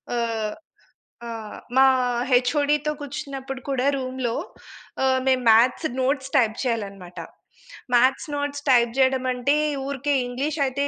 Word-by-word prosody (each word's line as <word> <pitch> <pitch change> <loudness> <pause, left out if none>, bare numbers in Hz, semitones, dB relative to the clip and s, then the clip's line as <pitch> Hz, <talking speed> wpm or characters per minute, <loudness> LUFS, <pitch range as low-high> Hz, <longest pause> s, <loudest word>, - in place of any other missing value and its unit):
ఆహ్, 225 -2 -2 0.7
ఆహ్, 225 -2 -7 0.2
మా 265 - +7 0.5
హెచ్ఓడి‌తో 290 +4 +2
కూర్చున్నప్పుడు 270 -2 -6
కూడా 265 -1 0
రూమ్‌లో 255 -2 -3 0.7
ఆహ్, 260 0 +3
మేము 260 -1 +2
మ్యాథ్స్ 245 +8 +4
నోట్స్ 270 0 -1
టైప్ 225 -3 +2
చేయాలనమాట. 200 -7 -4 0.8
మ్యాథ్స్ 260 +5 +3
నోట్స్ 285 0 -4
టైప్ 235 -2 +4
చేయడమంటే, 260 +1 +2 0.3
ఊరికే 280 +1 -1
ఇంగ్లీష్ 280 +5 -3
అయితే 280 +2 -1
260 Hz, 110 wpm, -23 LUFS, 240-280 Hz, 0.8 s, మా